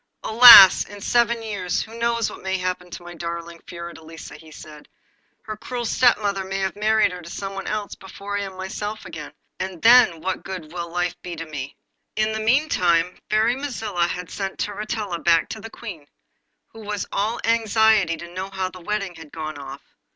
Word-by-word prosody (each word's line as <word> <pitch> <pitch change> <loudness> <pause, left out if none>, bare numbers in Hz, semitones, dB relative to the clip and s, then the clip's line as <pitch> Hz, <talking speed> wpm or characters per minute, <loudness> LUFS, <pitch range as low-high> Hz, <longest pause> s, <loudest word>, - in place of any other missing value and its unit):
'Alas! 220 -4 +10
in 205 0 -11
seven 235 +2 +1
years 200 -5 -2
who 225 +1 -12
knows 235 -1 0
what - - -9
may 190 0 -2
happen 180 -1 -4
to 175 - -9
my 175 0 -10
darling 170 0 -6
Fiordelisa!' 170 -2 -10
he 160 - -15
said. 150 -1 -13 0.5
'Her 215 - -6
cruel 240 +2 -5
stepmother 210 -5 +2
may 190 +1 -4
have 190 0 -2
married 215 -1 +2
her 180 0 -8
to 170 - -11
someone 195 +1 -6
else 210 -1 -3
before 200 +1 -8
I - - -3
am 190 -2 -7
myself 205 +3 -5
again, - - -8 0.3
and 185 -2 -5
then 230 -8 +6
what 190 +3 -3
good 175 -5 -8
will 170 -1 -5
life 175 0 -1
be 175 -1 -7
to 165 - -6
me?' 145 -3 -7 0.4
In 215 0 +1
the 220 - -3
meantime 185 - +2
the - - -26
Fairy 220 +3 +2
Mazilla 220 -10 -2
had 180 0 -6
sent 195 -1 -5
Turritella 210 -3 -4
back 165 -1 +3
to 220 - -7
the 225 - -8
Queen, 180 -12 -10 0.6
who 225 - -14
was 210 -1 -4
all 215 +4 -1
anxiety 220 -5 +3
to 170 +1 -10
know 190 +1 -5
how 190 -1 -3
the 185 +1 -12
wedding, 200 0 -3
had 160 -3 -13
gone 155 -2 -6
off. 135 0 -9
195 Hz, 190 wpm, -22 LUFS, 170-220 Hz, 0.6 s, Alas